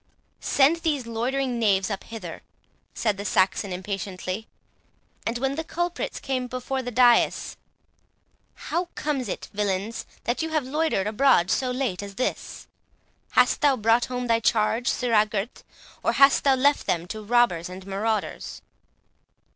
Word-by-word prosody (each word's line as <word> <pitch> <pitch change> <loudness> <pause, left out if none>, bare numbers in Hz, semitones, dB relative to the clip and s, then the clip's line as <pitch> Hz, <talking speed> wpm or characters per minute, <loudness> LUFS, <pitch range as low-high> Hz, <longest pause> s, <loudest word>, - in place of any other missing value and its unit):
"Send 285 +4 +3
these 300 -6 -1
loitering 245 +2 -1
knaves 195 -3 +2
up 195 - -4
hither," 210 -7 -8 0.5
said 210 -3 0
the 200 - -5
Saxon, 190 0 +1
impatiently. 190 +2 -4 0.8
And 230 +1 -1
when 270 +2 -1
the 320 +3 -3
culprits 345 +2 -3
came 255 -2 -2
before 255 +2 -3
the 245 - -5
dais,—"How 245 +7 -1
comes 275 -7 -2
it, - - -5
villains! 205 +2 -2 0.2
that 240 +5 -1
you 320 - -2
have 310 -4 0
loitered 300 -7 0
abroad 210 -4 +3
so 255 - +1
late 250 -7 -2
as 200 -1 -8
this? 255 - -3 0.7
Hast 250 0 +4
thou 285 -3 +4
brought 230 +2 +3
home 250 0 -4
thy 230 -1 +2
charge, 230 +2 +1
sirrah 225 -4 +2
Gurth, 210 +2 -4 0.4
or - - +1
hast 275 +1 +5
thou 270 -1 +5
left 280 +2 +2
them 170 -1 0
to 220 - -5
robbers 205 -7 +2
and 185 +1 -9
marauders?" 210 +3 -3
235 Hz, 145 wpm, -25 LUFS, 200-265 Hz, 0.8 s, hast